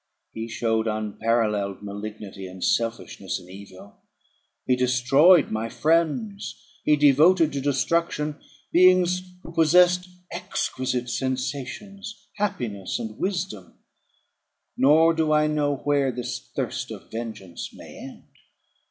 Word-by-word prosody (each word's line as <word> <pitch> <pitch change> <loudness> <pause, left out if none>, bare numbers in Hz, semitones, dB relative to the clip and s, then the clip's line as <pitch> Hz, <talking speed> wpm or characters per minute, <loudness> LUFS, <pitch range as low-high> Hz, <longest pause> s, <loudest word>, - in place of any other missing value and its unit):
He 110 +1 -5
showed 110 -1 0
unparalleled 105 -2 -1
malignity 100 -1 -7
and 90 0 -9
selfishness, 115 0 -1
in 90 - -15
evil: 100 0 -13 0.7
he 125 - +3
destroyed 130 +7 +4
my 110 +1 -2
friends; 170 - 0 0.3
he 150 - +4
devoted 150 +3 +5
to 140 - -2
destruction 150 +2 0 0.3
beings 180 0 +5 0.2
who - - -9
possessed 180 +3 +4 0.2
exquisite 130 -1 -2
sensations, 135 - -4 0.2
happiness, 120 - -2
and 110 -2 -7
wisdom; 175 - -3 1.0
nor 160 +4 +5
do 160 -1 0
I 150 0 +4
know 150 -2 +1
where 140 -1 +1
this 125 0 -4 0.2
thirst - - -2
for - - -7
vengeance 110 -6 -7
may - - -12
end. - - -10
135 Hz, 110 wpm, -24 LUFS, 110-165 Hz, 1.0 s, devoted